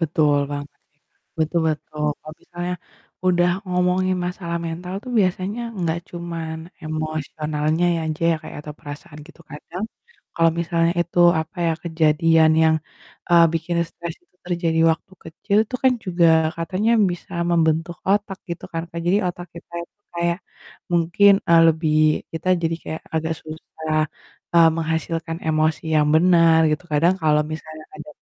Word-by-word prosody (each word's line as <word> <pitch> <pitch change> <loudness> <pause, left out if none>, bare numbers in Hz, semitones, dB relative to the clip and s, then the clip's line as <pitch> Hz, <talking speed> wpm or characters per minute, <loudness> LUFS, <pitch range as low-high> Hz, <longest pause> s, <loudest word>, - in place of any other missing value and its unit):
Betul 155 -3 +2
banget 145 0 -4
ya, - - -41
Kak. - - -50 0.5
Betul, 160 +2 +1
betul. 150 0 -4
Kalau 155 - -11
misalnya 175 +1 -4 0.5
udah 175 -1 +3 0.2
ngomongin 180 +1 +1
masalah 175 -2 -4
mental 175 +3 -5
tuh 255 - -8
biasanya 190 +3 0 0.2
enggak 170 -1 0
cuman 170 -2 -5 0.3
emosionalnya 155 0 -2
ya - - -2
aja 155 +1 -4
ya, - - 0
Kak, - - -9
atau 150 0 -8
perasaan 150 +2 -10
gitu, 170 0 -17
kadang 165 +7 -6 0.5
kalau 165 0 +4
misalnya 170 0 +1
itu, 175 +1 -2 0.2
apa 160 +2 -8
ya, - - +2
kejadian 160 0 +3
yang, 160 0 +4 0.6
eee, 170 -1 +7
bikin 170 +1 -2
stres 170 0 -7
itu 180 - -42
terjadi 170 -2 0
waktu 165 +4 -4
kecil 200 +6 -1
tuh 255 - -2
kan 260 - +6
juga 175 -2 +3 0.3
katanya 185 +7 -1 0.2
bisa 175 - -8 0.2
membentuk 165 0 +1
otak, 200 -1 0
gitu 170 - -5
kan, 165 0 -2
Kak. 170 - -5
Jadi, 195 +4 +4
otak 175 0 -5
kita, 170 0 -13
itu - - -37 0.2
kayak 170 0 0 0.5
mungkin, 175 +4 +4 0.2
eee, 165 0 +7
lebih 160 -1 +1 0.4
kita 165 +2 -4
jadi 165 0 +1
kayak 160 - -5
agak 160 0 0
susah, 155 0 -6 0.6
eee, 165 -1 +8
menghasilkan 165 0 -2
emosi 155 0 +1 0.2
yang 150 - +2
benar, 165 -1 +5
gitu. 150 +3 -2
Kadang 165 +5 +3
kalau 150 -1 +3
misalnya 155 0 -8
ada 155 0 -10
165 Hz, 155 wpm, -22 LUFS, 155-175 Hz, 0.6 s, eee